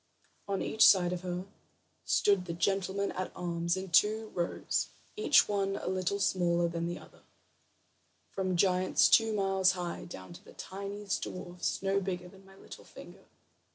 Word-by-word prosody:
On 195 -1 -1
each 220 - +2
side 180 -2 +6
of 180 - -4
her 180 0 -4 0.6
stood 200 -3 +2
the 170 - -4
gentlemen 195 +2 -1
at 185 0 -4
arms 170 0 -2
in 190 -1 -6
two 215 +4 +3
rows, 175 -1 -2 0.3
each 425 -8 +4
one 195 -1 -1
a - - -6
little 185 +1 -1
smaller 175 -3 +1
than 170 0 -3
the 175 - -4
other, - - -16 1.1
from 185 -2 -1
giants 185 0 +3
two 225 -1 +4
miles 195 -2 +2
high, 175 -2 -5
down 95 - -10
to - - -13
the - - -15
tiniest 200 +1 -5
dwarf 180 0 -4
no 195 0 +2
bigger 180 -2 -4
than 195 +1 -17
my 195 - -17
little - - -12
finger. - - -14
185 Hz, 160 wpm, -31 LUFS, 175-195 Hz, 1.1 s, side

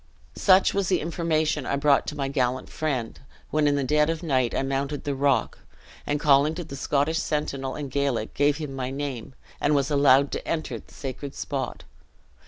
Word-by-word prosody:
"Such 190 -1 +5
was 195 -2 0
the 185 - +3
information 160 -2 0
I - - 0
brought 140 0 +3
to 150 - -4
my 140 -1 -1
gallant 130 -2 -1
friend, 135 -7 -3 0.3
when 150 -1 +2
in 145 - +3
the 140 - 0
dead 150 +3 +2
of 165 +1 -2
night 130 -6 +1
I - - 0
mounted 135 +2 -2
the 145 - -1
rock, 135 -3 +1 0.5
and 145 0 0
calling 145 +2 +4
to 175 - -4
the 145 -4 -9
Scottish 145 +4 0
sentinel 135 -3 -2
in 145 -1 -4
Gaelic, 135 -5 -1
gave 145 +1 +2
him 150 -4 -5
my 130 -1 -3
name, 135 -2 -5 0.2
and 145 0 +2
was 140 +1 +1
allowed 140 -1 +5
to - - -5
enter 160 -1 -2
the - - -19
sacred 140 +1 -6
spot. 135 -3 -4
140 Hz, 190 wpm, -25 LUFS, 135-150 Hz, 0.5 s, Such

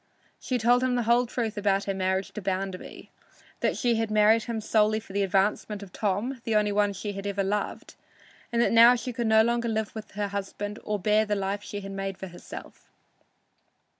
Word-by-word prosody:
She 255 - -1
told 245 +2 +3
him 255 -1 +1
the 245 - +1
whole 240 +2 +3
truth 225 -3 -3
about 200 -1 +1
her 195 - -2
marriage 190 0 -1
to 215 - -6
Bounderby 190 0 -4 0.5
that - - 0
she 240 -2 +1
had 225 -1 -1
married 215 +1 +4
him 230 -2 -3
solely 215 0 +2
for 215 -3 -13
the 200 - +1
advancement 200 +2 0
of 190 - -13
Tom, 220 +5 -2
the 225 - -1
only 210 -1 +3
one 205 0 +2
she 205 +2 -5
had 195 +1 -5
ever 200 0 -1
loved 205 +2 -3 0.6
and 235 - 0
that - - +2
now 235 +2 +8
she 250 +1 -4
could 235 0 -1
no 220 0 +6
longer 235 0 0
live 220 -1 -2
with 220 -1 -8
her 205 0 -2
husband 200 +1 -5
or 210 - -1
bear 210 +2 +3
the 210 -1 -1
life 200 +1 -2
she 205 0 -6
had 195 0 -7
made 195 -1 -4
for 190 - -7
herself. 175 - -11
210 Hz, 210 wpm, -27 LUFS, 195-225 Hz, 0.6 s, now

